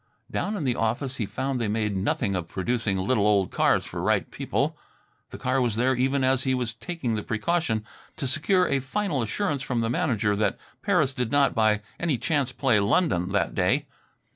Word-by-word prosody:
Down 210 +1 -1
in 170 - -3
the 125 -3 +1
office 120 +4 -1
he 110 - -2
found 130 +4 -2
they 115 - 0
made 105 -1 -1
nothing 100 +1 0
of 90 -3 -3
producing 100 +1 -1
little 105 +2 +2
old 100 -3 +2
cars - - +2
for - - -8
the - - -2
right - - +1
people. - - -1 0.5
The - - -8
car 130 +1 0
was 120 -4 0
there 125 +3 +2
even 130 +2 +1
as 130 0 +3
he 130 -1 +1
was 120 -3 -2
taking 135 -1 -4
the 105 - -1
precaution 115 -1 -1 0.3
to - - -3
secure 175 +7 +2
a 140 - +1
final 150 +2 -1
assurance 145 - -1
from 125 -3 -1
the 115 0 0
manager 115 - +1
that 105 -1 0 0.2
Paris 175 -10 +2
did 125 -2 -2
not 145 -1 +3
by 110 -2 +2 0.2
any 165 -6 0
chance 145 -3 0
play 125 -3 +2
London 100 - +1
that 100 - +1
day. 110 +11 +1
125 Hz, 200 wpm, -26 LUFS, 105-140 Hz, 0.5 s, as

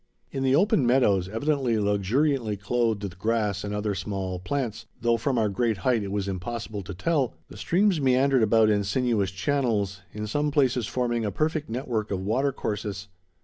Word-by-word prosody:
In 135 - -3
the 135 0 +3
open 175 -3 +3
meadows, 105 -8 +3
evidently 130 +1 0
luxuriantly 110 +4 +1
clothed 110 0 0
with 95 -2 -6
grass 105 -3 0
and 100 - -4
other 105 0 -1
small 95 -1 -3
plants, 125 +1 -3
though 120 0 +2
from 130 +3 -1
our 110 -2 +3
great 110 +2 0
height 115 +5 +1
it 100 -1 -4
was 100 -1 -2
impossible 105 +2 -4
to 95 0 -8
tell, 135 - 0
the - - -11
streams 185 -2 +2
meandered 130 0 +3
about 110 0 +4
in 100 -1 +2
sinuous 105 -1 +1
channels, 100 -2 -1
in 105 0 -5
some 145 +8 0
places 130 -5 +1
forming 120 -2 -1
a 105 - 0
perfect 155 - -1
network 115 -3 -2
of 100 - -2
watercourses. 105 -5 -2
110 Hz, 175 wpm, -26 LUFS, 100-130 Hz, -, about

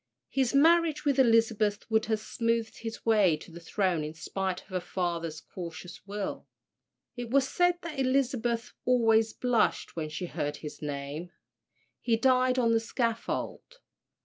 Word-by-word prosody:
His 265 -1 +1
marriage 320 +1 +4
with 280 -2 +2
Elizabeth 225 -4 +3
would 220 0 +3
have 220 -1 +1
smoothed 230 +1 -1
his 225 -1 -7
way 205 -8 +4
to 170 - -13
the 170 - -9
throne 175 -1 0
in 155 +1 -6
spite 190 +4 -3
of - - -26
her 185 -1 -1
father's 170 -3 -3
cautious 175 +1 -9
will. 205 0 -4 0.7
It 245 -1 -5
was 270 +1 +3
said 355 +4 +2
that 315 -4 -5
Elizabeth 255 -3 0
always 225 -3 +3
blushed 245 -2 0
when 155 -2 -3
she 155 +4 -4
heard 145 -3 -3
his 150 - -9
name. 145 +3 -5 0.7
He 230 -2 +2
died 255 +1 +3
on 235 -2 +3
the 225 - +4
scaffold. 230 - -3
225 Hz, 150 wpm, -29 LUFS, 180-250 Hz, 0.7 s, marriage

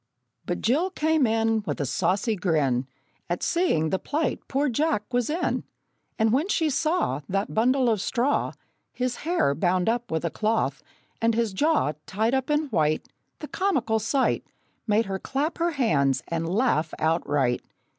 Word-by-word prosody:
But 175 - -2
Jill 300 +11 +2
came 315 -6 +2
in, 225 0 +1
With - - -2
a 145 - 0
saucy 190 - 0
grin 145 -9 +1 0.4
At 175 - -2
seeing 335 - +1
the 190 - +1
plight 300 -2 -1
poor 280 +2 +1
Jack 290 -2 +1
was 245 +1 +1
in; 330 +4 -1 0.5
And 220 0 +2
when 290 +8 +2
she 320 -6 +1
saw 285 - 0
That 195 +2 -1
bundle 255 +3 +3
of 220 -4 +2
straw 260 +6 0 0.4
(His 250 -1 -2
hair) 325 - +1
bound 180 +3 +1
up 240 +1 0
with 160 +1 -1
a 165 - -1
cloth, 220 +5 0 0.4
and 230 0 +2
his 230 -3 0
jaw 300 - +2 0.2
Tied 220 +5 0
up 265 +1 0
in 295 0 +3
white, 155 -8 0 0.3
The 300 - -5
comical 255 - 0
sight 260 +5 +1 0.4
Made 215 +2 +3
her 195 0 -3
clap 290 - -2
her 340 0 +1
hands 145 - +2
and 165 0 -2
laugh 180 - +1
outright! 145 -6 +1
225 Hz, 165 wpm, -25 LUFS, 175-280 Hz, 0.5 s, bundle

